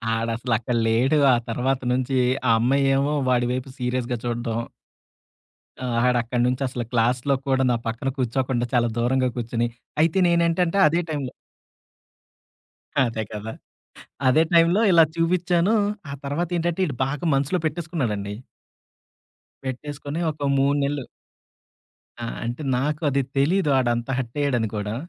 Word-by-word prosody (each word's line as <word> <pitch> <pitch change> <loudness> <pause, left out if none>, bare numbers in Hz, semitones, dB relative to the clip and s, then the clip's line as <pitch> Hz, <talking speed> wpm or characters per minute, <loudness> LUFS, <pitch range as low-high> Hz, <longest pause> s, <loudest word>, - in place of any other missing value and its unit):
ఆడసలు 115 +1 -2
అక్కడ 120 +1 -2
లేడు. 125 +7 +3 0.2
ఆ - - +5
తర్వాత 130 +3 0
నుంచీ 130 +1 0 0.3
ఆ - - +6
అమ్మాయేమో 135 +3 +2 0.2
వాడి 125 -1 +2
వైపు 130 +1 -4
సీరియస్‌గా 125 -1 -1
చూడడం. 120 -1 -2 1.2
ఆ! - - -3 0.2
ఆడక్కడనుంచసలు 125 +1 0
క్లాస్‌లో 125 +3 +2
కూడా 135 -1 +2
నా - - +2
పక్కన 115 +4 -2
కూర్చోకుండా, 125 0 0
చాలా 120 -1 +3
దూరంగా 130 +1 +2
కూర్చుని 120 0 -1 0.3
అయితే 165 +3 +2
నేనేంటంటే, 170 +1 +2
అదే 170 +3 +1
టైంలో 140 -5 -3 1.7
అదే 115 -3 0
కదా! 105 +1 -5 0.8
అదే 155 +5 +5
టైంలో 170 +4 +5
ఇలా 165 -3 +7
చూపిచ్చానూ, 175 +4 +2 0.4
ఆ - - -5
తర్వాతేంటంటే, 170 +4 -1
ఈడు 140 - -5
బాగా 145 +4 -3
మనసులో 140 +6 +1
పెట్టేసుకున్నాడండీ. 140 - -2 1.3
పెట్టేసుకొని 145 +3 -5
ఒక 145 -1 -3
3 140 +1 +2
నెలలు 140 -2 -2 1.2
ఆ! - - -4 0.2
అంటే 120 +5 -4 0.2
నాకు 150 +4 -1
అది 140 0 +1 0.2
తెలియదు 155 +4 +2
ఆడంత 120 -1 0
హర్టయ్యాడని 125 -2 -1
కూడా. 105 +1 -3
130 Hz, 120 wpm, -23 LUFS, 120-150 Hz, 1.7 s, ఇలా